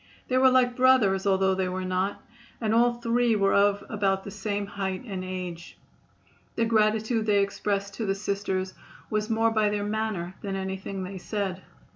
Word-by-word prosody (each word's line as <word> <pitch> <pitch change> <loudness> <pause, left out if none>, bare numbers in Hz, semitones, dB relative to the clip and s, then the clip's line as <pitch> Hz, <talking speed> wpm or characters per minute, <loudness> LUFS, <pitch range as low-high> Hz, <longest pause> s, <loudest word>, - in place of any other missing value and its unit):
They 255 - +2
were 260 0 +6
like 250 -1 +3
brothers, 235 -7 +4
although 190 0 +3
they 190 -1 -1
were 185 0 -3
not, 185 +2 -1 0.4
and 220 -2 0
all 240 +1 +4
three 235 0 +1
were 195 -1 +2
of 200 0 +3
about 195 -3 0
the 200 - -7
same 205 0 -3
height 195 -1 -4
and 190 -5 -5
age. 180 -2 -6 0.8
The 230 - +1
gratitude 220 0 +1
they 205 -1 +4
expressed 200 0 -2
to 220 - -2
the 195 - +1
Sisters 195 -2 -2 0.4
was 215 0 -1
more 225 0 +2
by 215 -1 +2
their 205 0 -2
manner 210 -4 -2
than 195 -1 -3
anything 190 0 -4
they 190 +1 -6
said. 190 -1 -3
200 Hz, 175 wpm, -27 LUFS, 190-220 Hz, 0.8 s, were